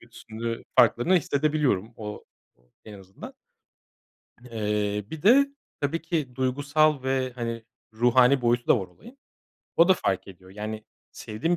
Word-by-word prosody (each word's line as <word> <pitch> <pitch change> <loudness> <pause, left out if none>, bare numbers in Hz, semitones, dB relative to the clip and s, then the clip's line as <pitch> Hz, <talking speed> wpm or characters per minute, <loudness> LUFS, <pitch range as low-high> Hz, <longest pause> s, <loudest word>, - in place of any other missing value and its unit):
kötüsünü 115 0 -7
farklarını 170 +11 +4
hissedebiliyorum 145 - 0
o 105 -1 -8 0.6
en 105 - -11
azından. 95 0 -12 1.2
Eee, 105 -2 -1
bir 160 - -7
de 270 - +5 0.3
tabii 145 +4 -1
ki 155 -7 -3
duygusal 145 +2 +1
ve, 130 -1 -1
hani, 115 -2 -4 0.3
ruhani 125 +3 +4
boyutu 120 0 +1
da - - +4
var 95 - -6
olayın. 240 +4 -17 0.6
O 170 +2 +6
da 190 - +6
fark 95 - -2
ediyor. 95 0 -14
Yani, 110 +2 -6 0.3
sevdiğim 135 +12 -2
125 Hz, 130 wpm, -26 LUFS, 110-150 Hz, 1.2 s, O